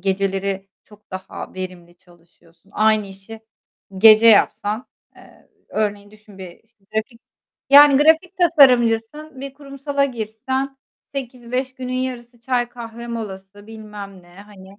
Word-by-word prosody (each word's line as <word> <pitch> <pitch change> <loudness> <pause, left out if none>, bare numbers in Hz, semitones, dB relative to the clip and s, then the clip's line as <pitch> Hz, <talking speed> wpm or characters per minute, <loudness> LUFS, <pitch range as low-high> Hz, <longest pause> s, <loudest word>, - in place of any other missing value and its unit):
geceleri 195 0 -2 0.2
çok 210 0 -21
daha 190 0 -8
verimli 180 -2 -8
çalışıyorsun. 170 0 -26
Aynı 215 -1 +2
işi 195 +3 -12 0.6
gece 220 +2 +8
yapsan, 215 +1 +3 0.3
eee, - - -20 0.2
örneğin 205 -1 -3
düşün 215 -2 -18
bir, 185 -2 -8
işte, 220 -3 -38
grafik, 230 +2 -3 0.5
yani 285 0 +8
grafik 325 +4 +3
tasarımcısın, 270 -3 +3
bir 275 0 -7
kurumsala 280 0 -3
girsen 260 +3 -4 0.4
08.00-17.00 255 0 -4
günün 255 -1 -6
yarısı 250 -2 -5
çay, 245 -1 -1
kahve 235 -1 -9
molası 205 -3 -8
bilmem 210 -3 -10
ne, 175 0 -20
hani. 200 -1 -15
220 Hz, 120 wpm, -20 LUFS, 195-255 Hz, 0.6 s, gece